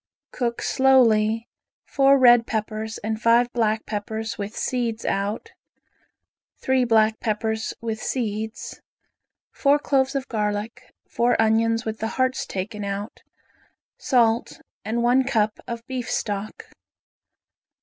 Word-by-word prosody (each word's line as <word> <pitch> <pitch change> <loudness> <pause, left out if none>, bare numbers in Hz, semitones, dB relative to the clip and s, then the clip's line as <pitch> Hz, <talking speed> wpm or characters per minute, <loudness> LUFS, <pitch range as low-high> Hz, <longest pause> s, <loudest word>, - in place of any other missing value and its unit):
Cook 235 -2 -3
slowly 230 -4 +3 0.4
four 275 0 +4
red 240 -3 +6
peppers 220 0 -3
and 220 +1 -3
five 240 +1 +3
black 220 -2 0
peppers 220 +1 -4
with 205 +2 -6
seeds 235 -3 -2
out, 200 +2 -2 1.1
three 260 -1 +1
black 220 -1 +3
peppers 220 0 -2
with 225 -1 -4
seeds, 220 -3 -4 0.7
four 285 +1 +3
cloves 270 -2 0
of 275 0 -2
garlic, 210 0 -3 0.2
four 240 +1 +1
onions 225 +1 +2
with 220 0 -4
the 220 - -2
hearts 260 0 0
taken 210 +2 -5
out, 200 +2 -5 0.7
salt, 235 -3 +1 0.2
and 230 +3 -1
one 250 +2 +4
cup 220 -5 0
of 235 0 -6
beef 255 -3 -5
stock. 205 0 -4
225 Hz, 120 wpm, -23 LUFS, 215-245 Hz, 1.1 s, red